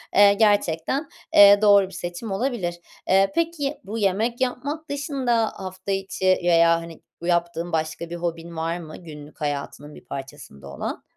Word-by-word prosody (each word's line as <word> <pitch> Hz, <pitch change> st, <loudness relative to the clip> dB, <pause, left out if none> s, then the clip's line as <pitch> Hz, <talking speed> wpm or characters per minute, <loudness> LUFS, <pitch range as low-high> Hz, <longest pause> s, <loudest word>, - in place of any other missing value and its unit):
eee, 200 Hz, 0 st, +7 dB
gerçekten, 205 Hz, -, +1 dB, 0.3 s
eee, 200 Hz, 0 st, +9 dB
doğru 200 Hz, -2 st, +6 dB
bir -, -, -14 dB
seçim 175 Hz, +4 st, -6 dB
olabilir. 195 Hz, -5 st, -2 dB, 0.3 s
Eee, 195 Hz, +4 st, +4 dB
peki, 325 Hz, -4 st, -1 dB
bu 210 Hz, +4 st, -6 dB
yemek 220 Hz, +4 st, 0 dB
yapmak 285 Hz, +5 st, -3 dB
dışında 270 Hz, -5 st, 0 dB
hafta 185 Hz, +1 st, -6 dB
içi 195 Hz, -1 st, -3 dB, 0.2 s
veya 170 Hz, -1 st, +4 dB
hani, 165 Hz, -1 st, -11 dB, 0.2 s
bu 170 Hz, -, -5 dB
yaptığın 170 Hz, 0 st, 0 dB
başka 160 Hz, +1 st, -2 dB
bir 175 Hz, -, -5 dB
hobin 170 Hz, -1 st, -5 dB
var 165 Hz, +2 st, -2 dB
mı 155 Hz, -2 st, -9 dB
günlük 150 Hz, -3 st, -12 dB
hayatının 145 Hz, 0 st, -4 dB
bir -, -, -15 dB
parçasında 135 Hz, -, -9 dB
olan? 70 Hz, -, -5 dB
185 Hz, 155 wpm, -23 LUFS, 165-225 Hz, 0.3 s, eee